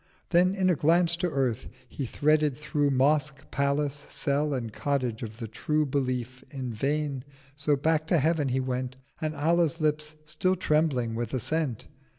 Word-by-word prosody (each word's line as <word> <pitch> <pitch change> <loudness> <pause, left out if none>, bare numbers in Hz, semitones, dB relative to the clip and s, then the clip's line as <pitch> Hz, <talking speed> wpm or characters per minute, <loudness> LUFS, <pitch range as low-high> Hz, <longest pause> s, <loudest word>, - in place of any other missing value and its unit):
Then, 180 +2 +4
in 190 -2 +1
a - - +2
Glance 170 +3 +3
to 175 0 0
Earth, 130 -5 -1 0.2
he 135 - -5
threaded 150 +1 +2
through 150 -1 0
Mosque, 140 +1 +1
Palace, 140 +1 0
Cell 145 +1 0
and 120 -5 -3
Cottage 130 -5 -1
of 110 -2 -6
the 115 -2 -5
True 150 +8 0
710 140 - -5
Belief—in 130 -1 -3
vain; 140 +2 -1 0.3
so 145 +1 +1
back 155 +2 +1
to 170 - +3
Heaven 155 -1 +2 0.2
went 130 0 -2 0.3
And—Allah's 160 +2 +1
Lips 150 0 -1
still 170 +5 +1
trembling 150 -9 +1
with 120 +2 -3
assent! 135 -1 -2
145 Hz, 155 wpm, -28 LUFS, 130-155 Hz, 0.3 s, Then